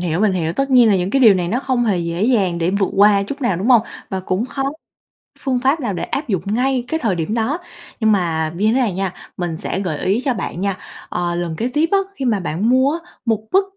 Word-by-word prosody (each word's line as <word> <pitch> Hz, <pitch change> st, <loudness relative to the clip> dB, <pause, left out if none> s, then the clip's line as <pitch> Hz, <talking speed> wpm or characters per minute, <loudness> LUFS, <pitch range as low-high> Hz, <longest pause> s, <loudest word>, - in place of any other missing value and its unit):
hiểu, 175 Hz, 0 st, -1 dB
mình 210 Hz, -2 st, +3 dB
hiểu. 165 Hz, -3 st, -1 dB
Tất 275 Hz, +8 st, -1 dB
nhiên 245 Hz, -3 st, +6 dB
là 200 Hz, -, +4 dB
những 180 Hz, +1 st, -1 dB
cái 270 Hz, -, +2 dB
điều 220 Hz, -6 st, +7 dB
này 180 Hz, -2 st, -1 dB
nó 240 Hz, +7 st, 0 dB
không 255 Hz, -3 st, 0 dB
hề 205 Hz, -5 st, +1 dB
dễ 170 Hz, +1 st, -2 dB
dàng 195 Hz, -9 st, +2 dB
để 170 Hz, +1 st, +1 dB
vượt 195 Hz, 0 st, +1 dB
qua 200 Hz, 0 st, +5 dB
chút 275 Hz, +9 st, -6 dB
nào, 215 Hz, -8 st, +1 dB
đúng 190 Hz, -, -3 dB
hông? 240 Hz, -4 st, +6 dB, 0.3 s
Và 190 Hz, -1 st, -2 dB
cũng 185 Hz, +5 st, -2 dB
khó 270 Hz, +1 st, -4 dB, 0.8 s
phương 260 Hz, -2 st, 0 dB
pháp 270 Hz, +5 st, +2 dB
nào 235 Hz, -8 st, -2 dB
để -, -, -4 dB
áp 285 Hz, -, -3 dB
dụng 195 Hz, -7 st, 0 dB
ngay 250 Hz, +5 st, 0 dB
cái 320 Hz, 0 st, -1 dB
thời 210 Hz, -5 st, +1 dB
điểm 165 Hz, +4 st, -2 dB
đó. 235 Hz, +7 st, 0 dB, 0.4 s
Nhưng 220 Hz, -1 st, +3 dB
mà 165 Hz, -5 st, 0 dB
như 200 Hz, -, -1 dB
thế 220 Hz, -, +3 dB
này 230 Hz, -8 st, +1 dB
nha, 190 Hz, -1 st, -2 dB, 0.2 s
mình 175 Hz, -3 st, -3 dB
sẽ 185 Hz, -, -3 dB
gợi 175 Hz, -6 st, -2 dB
ý 205 Hz, +6 st, +1 dB
cho 265 Hz, -, +2 dB
bạn 185 Hz, -5 st, -5 dB
nha, 195 Hz, -1 st, -1 dB, 0.3 s
ờ, 175 Hz, -1 st, -2 dB
lần 170 Hz, -2 st, -3 dB
kế 230 Hz, -, -1 dB
tiếp 315 Hz, +2 st, +2 dB
á, 400 Hz, -, +5 dB, 0.2 s
khi 270 Hz, -, -4 dB
mà 220 Hz, -5 st, +2 dB
bạn 180 Hz, +5 st, -1 dB
mua 260 Hz, +4 st, +3 dB
á, 355 Hz, -, -21 dB
một 220 Hz, -2 st, 0 dB
bất 385 Hz, +1 st, +4 dB
205 Hz, 265 wpm, -19 LUFS, 180-250 Hz, 0.8 s, điều